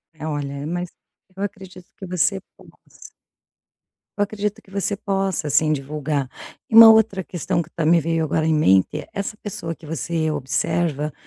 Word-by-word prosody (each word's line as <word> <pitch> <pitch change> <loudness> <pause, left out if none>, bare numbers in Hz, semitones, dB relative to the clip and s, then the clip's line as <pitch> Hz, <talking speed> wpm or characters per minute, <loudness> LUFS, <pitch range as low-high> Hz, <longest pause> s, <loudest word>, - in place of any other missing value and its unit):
É, 155 0 -6
olha, 140 -2 -4
mas 175 +1 -3 0.5
eu 195 - -8
acredito 190 -2 -8
que 190 - -8
você 185 +2 0 0.2
possa - - -21 1.2
Eu 205 - +3
acredito 210 0 -4
que - - -23
você 200 +1 -1
possa 195 -6 -2
sim 155 +2 +3
divulgar. 145 -1 -3 0.4
E - - -1
uma 225 0 +11
outra 220 -4 +3
questão 170 0 -2
que 165 - -19
também 165 +1 +2
me 170 - +5
veio 165 +1 0
agora 155 +1 0
em 160 - +2
mente, 95 -12 +2
essa 200 +2 -4
pessoa 170 -5 -5
que 155 -1 -14
você 160 +1 -2
observa, 150 +2 -1
165 Hz, 165 wpm, -22 LUFS, 150-195 Hz, 1.2 s, uma